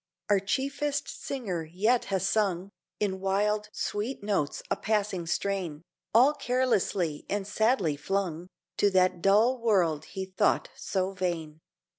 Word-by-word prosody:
Our 200 - +5
chiefest 280 +7 -1
singer 200 -12 -4
yet 205 +10 +1
has 190 -1 0
sung 195 -2 0 0.3
In 190 -2 -1
wild, 210 +2 0
sweet 210 +4 -3
notes 195 -8 -1
a - - +4
passing 200 -4 -1
strain, 175 -4 -2 0.3
All 255 +6 +6
carelessly 245 - 0
and 200 -1 -1
sadly 205 - +2
flung 180 +1 -2 0.3
To 205 - +4
that 185 -2 +2
dull 220 +7 +4
world 175 -9 +2
he 190 +3 -5
thought 185 0 +1
so 190 -1 -1
vain. 170 -5 -3
195 Hz, 130 wpm, -28 LUFS, 180-215 Hz, 0.3 s, All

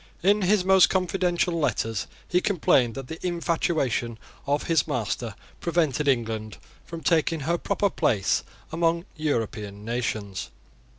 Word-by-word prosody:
In 205 +3 +4
his 190 0 +3
most 190 -1 +6
confidential 180 -1 +1
letters 115 - -1 0.2
he 180 - +2
complained 135 - +2
that 135 -2 -6
the 160 - -8
infatuation 165 -9 0 0.3
of 145 +1 +1
his 165 -4 +2
master 115 -2 -2 0.2
prevented 155 -4 0
England 110 -4 0 0.3
from 165 -1 -8
taking 165 -1 +2
her 170 +4 0
proper 200 0 +1
place 100 -4 +1 0.3
among 170 +1 +1
European 110 - -3
nations. 110 -4 -3
155 Hz, 125 wpm, -26 LUFS, 115-175 Hz, 0.3 s, most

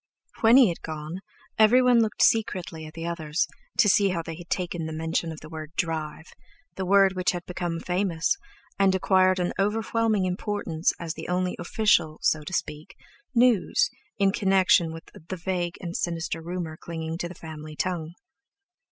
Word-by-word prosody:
When 230 +2 +6
he 255 -7 +7
had 170 - -5
gone 155 +3 -6 0.4
everyone 245 +2 +6
looked 220 -2 +1
secretly 185 -8 +1
at 155 - -13
the 165 0 -5
others, 165 -1 -1 0.3
to 210 - +5
see 200 0 +4
how 170 -3 -2
they 165 0 -6
had 175 +1 -12
taken 175 -3 -2
the - - -5
mention 160 +1 -2
of 155 - -9
the 155 - -10
word 155 -1 -8
"drive"—the 165 - -5
word 195 0 +5
which 185 0 0
had 175 -1 -5
become 175 -2 -3
famous, 180 - 0 0.4
and 195 -1 +4
acquired 185 0 +3
an 180 -1 -1
overwhelming 215 0 +1
importance, 185 -3 -1
as 165 -2 -4
the - - -8
only 180 0 0
official—so 165 -6 +2
to 150 - -7
speak—news 230 - 0 0.3
in 195 -1 +3
connection 190 -4 +3
with 165 0 -8 0.3
the 185 - -3
vague 175 -1 -2
and 175 -2 -5
sinister 165 -1 -2
rumour 170 -2 -5
clinging 165 0 -5
to 175 - -3
the 180 - -10
family 155 -2 -9
tongue. 170 -1 -3
175 Hz, 160 wpm, -26 LUFS, 160-195 Hz, 0.4 s, he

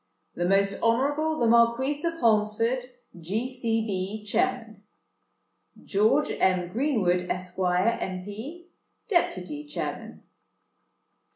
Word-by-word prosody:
"THE 175 - -2
MOST 195 0 +2
HONOURABLE 290 +7 +1
THE 240 - +1
MARQUIS 235 +6 +3
OF 335 0 -1
HOLMESFORD, 225 +2 +2 0.3
G. 205 +9 -2
C. 230 -3 -1
B., 200 +1 -3
Chairman. 225 -1 -1 1.0
"GEORGE 215 +9 +2
M. 185 -2 +2
GREENWOOD, 190 -7 0
Esq., 180 0 -4
M.P., 200 - -2 0.4
Deputy 300 - -1
Chairman. 295 0 -6
225 Hz, 95 wpm, -26 LUFS, 190-260 Hz, 1.0 s, MARQUIS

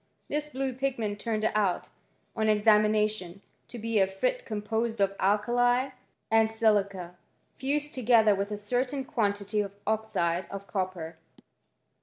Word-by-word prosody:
This 300 0 -2
blue 270 -1 -2
pigment 240 -6 -2
turned 215 0 -1
out, 205 -4 0 0.5
on 220 -1 +1
examination, 210 -3 +2 0.2
to 245 - -9
be 230 -1 0
a 190 - +4
frit - - -1
composed 220 +2 -2
of 195 0 +2
alkali 245 +6 +2 0.4
and 225 0 +4
I - - -10
silica, 200 -5 +1 0.4
fused 295 +3 -1
togetherwithacertainquantityofoxideof 210 - 0
I - - -3
copper. 185 -5 -4
215 Hz, 105 wpm, -28 LUFS, 200-240 Hz, 0.5 s, a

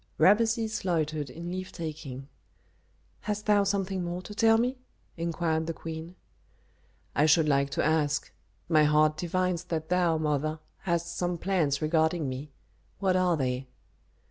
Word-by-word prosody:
Rameses 225 +2 +3
loitered 155 -5 -1
in 170 +6 -7
leave 185 0 -5
taking. 150 -5 -6 0.9
"Hast 210 0 -3
thou 205 -1 +4
something 195 -2 -1
more 175 +1 -4
to 210 - -8
tell 225 +1 +4
me?" 250 +3 0 0.4
inquired 165 -1 -1
the 165 - -3
queen. 165 +2 -7 1.0
"I 150 - +3
should 155 0 +5
like 140 -1 +2
to - - -1
ask 150 -2 +1 0.4
My 155 -2 +5
heart 150 +1 +4
divines 180 +1 -1
that 160 -2 -3
thou, 175 -2 +2
mother, 155 0 0 0.2
hast 170 -2 -2
some 175 -1 -1
plans 165 -6 0
regarding 160 0 +2
me. 130 +3 -5 0.5
What 190 -2 +1
are 180 -2 +3
they?" 130 -1 -2
165 Hz, 145 wpm, -28 LUFS, 155-185 Hz, 1.0 s, should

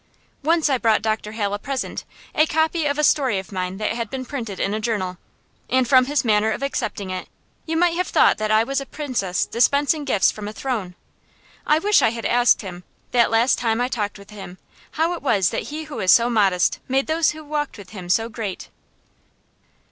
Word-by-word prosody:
Once 325 +2 +2
I 265 -3 +1
brought 220 -3 +2
Dr. 215 -1 -2
Hale 205 -2 -2
a 205 - -2
present, 270 +2 -4 0.3
a 310 - +3
copy 315 0 +1
of 285 0 -1
a 300 - 0
story 270 -8 +3
of 190 +1 -6
mine 185 0 -3
that 215 - -1
had 230 -1 -3
been 260 +1 -5
printed 230 -7 -5
in 200 - 0
a 215 - -1
journal; 195 -5 -2 0.5
and 260 -1 +2
from 255 0 +5
his 285 0 0
manner 215 -1 +3
of 220 - -3
accepting 210 -8 -3
it 185 - -5 0.4
you 320 0 -1
might 350 0 +3
have 365 - 0
thought - - +3
that 215 0 -1
I 215 +1 +4
was 275 +3 -2
a 275 - -8
princess 240 -12 -2
dispensing 285 +5 +2
gifts 210 -10 +2
from 210 -1 -7
a 210 - -6
throne. 215 -9 -4 0.7
I 300 - +4
wish 415 +6 +3
I - - +4
had 230 0 -6
asked 240 -1 +3
him, 180 -2 -8 0.3
that 240 -1 +4
last 230 +3 +3
time 225 -1 0
I 245 +1 0
talked 210 -5 -3
with 200 +1 -15
him, 195 -3 -10 0.4
how 325 +2 +1
it 345 - -6
was 205 -10 +2
that - - -3
he 310 +2 -5
who 300 -1 -8
was 185 -3 +3
so 235 +1 +5
modest 195 -5 +2
made 270 +1 +1
those 320 0 +2
who 310 +1 -6
walked 295 -2 -3
with 195 -3 -12
him 185 -5 -9
so 225 +5 +2
great. 215 -4 -6
235 Hz, 215 wpm, -22 LUFS, 205-285 Hz, 0.7 s, from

